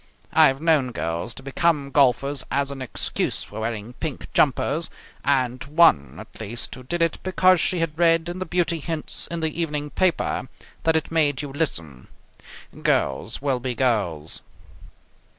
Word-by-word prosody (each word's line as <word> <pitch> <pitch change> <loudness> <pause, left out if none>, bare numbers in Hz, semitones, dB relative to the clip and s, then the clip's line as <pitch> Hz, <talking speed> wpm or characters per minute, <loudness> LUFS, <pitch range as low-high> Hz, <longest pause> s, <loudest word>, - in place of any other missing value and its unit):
I - - +7
have 135 0 0
known 150 -6 +2
girls 85 +6 -2
to 135 - -8
become 140 0 +1
golfers 140 0 +3
as 140 0 0
an 135 -1 -7
excuse 130 - -2
for 105 - -8
wearing 110 +1 -4
pink 150 +1 -6
jumpers, 150 +3 +2 0.3
and 130 -3 +1
one 115 - +4
at 110 +1 -11
least 110 +2 -4
who 130 - -8
did 165 +7 -1
it 165 - 0
because 185 -1 +4
she 185 - +1
had 160 -1 -2
read 165 -1 +4
in 175 +1 -5
the 185 - -4
beauty 170 -1 +1
hints 160 0 -3
in 170 -1 -4
the 160 +1 -1
evening 150 -2 -2
paper 180 -7 0 0.4
that 160 0 +3
it 160 0 0
made 150 -4 +2
you 140 -2 -6
lissome. 85 - -3 0.7
Girls - - 0
will 135 -3 +1
be 125 0 -3
girls. 100 - 0
140 Hz, 165 wpm, -24 LUFS, 125-165 Hz, 0.7 s, I